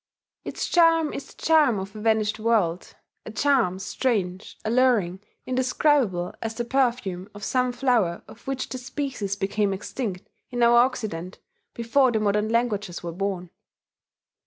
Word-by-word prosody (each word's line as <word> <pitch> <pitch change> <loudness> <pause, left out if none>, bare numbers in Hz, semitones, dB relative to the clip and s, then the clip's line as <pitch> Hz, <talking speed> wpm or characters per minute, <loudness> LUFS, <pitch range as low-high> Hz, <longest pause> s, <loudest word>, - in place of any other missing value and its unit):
Its - - -4
charm 330 -3 +4
is 280 - -6
the - - -20
charm 305 -8 +4
of 195 +2 -6
a 215 - -7
vanished 220 -1 +1
world 210 -7 0 0.3
a - - -8
charm 225 -5 +2
strange, 190 -2 -2
alluring, 220 -6 +2 0.3
indescribable 255 - +1
as 225 0 -4
the 240 - -3
perfume 235 -8 0
of 205 - -9
some 250 +3 +1
flower 240 -9 +1
of 230 - -15
which 270 -1 -2
the 255 - -5
species 250 -6 -3
became 200 +1 0
extinct 195 0 -4 0.2
in 245 -1 0
our 235 0 +6
Occident 215 -8 -1 0.4
before 245 +3 +3
the 220 - +1
modern 210 +1 +1
languages 215 -7 -1
were 170 - -4
born. 185 -1 -3
225 Hz, 145 wpm, -25 LUFS, 195-255 Hz, 0.4 s, our